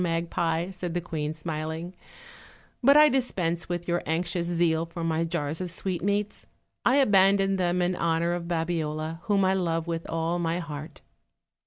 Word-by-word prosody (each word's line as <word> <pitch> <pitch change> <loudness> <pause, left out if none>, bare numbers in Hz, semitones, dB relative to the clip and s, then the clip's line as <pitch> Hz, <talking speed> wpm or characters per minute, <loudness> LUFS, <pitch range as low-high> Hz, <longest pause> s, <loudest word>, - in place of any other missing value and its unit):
magpie," 170 0 -1
said 180 -2 -5
the - - +2
queen, 155 -3 -3
smiling; 160 +2 -4 0.9
"but 280 +3 +6
I 300 0 +8
dispense 185 - 0
with 175 0 -3
your 175 0 +1
anxious 170 +2 -1
zeal 165 -1 +1
for 165 0 -6
my 165 0 0
jars 160 -1 -2
of 180 - -3
sweetmeats; 195 +4 -2 0.4
I 255 - +4
abandon 195 -6 +4
them 180 0 +1
in 180 +1 0
honor 170 0 +1
of 175 -1 -4
Babiola, 160 -2 -2
whom 200 -2 +3
I 190 - +3
love 165 -3 0
with 165 -1 -4
all 165 +1 -1
my 165 0 0
heart." 155 -2 -7
170 Hz, 160 wpm, -27 LUFS, 165-180 Hz, 0.9 s, I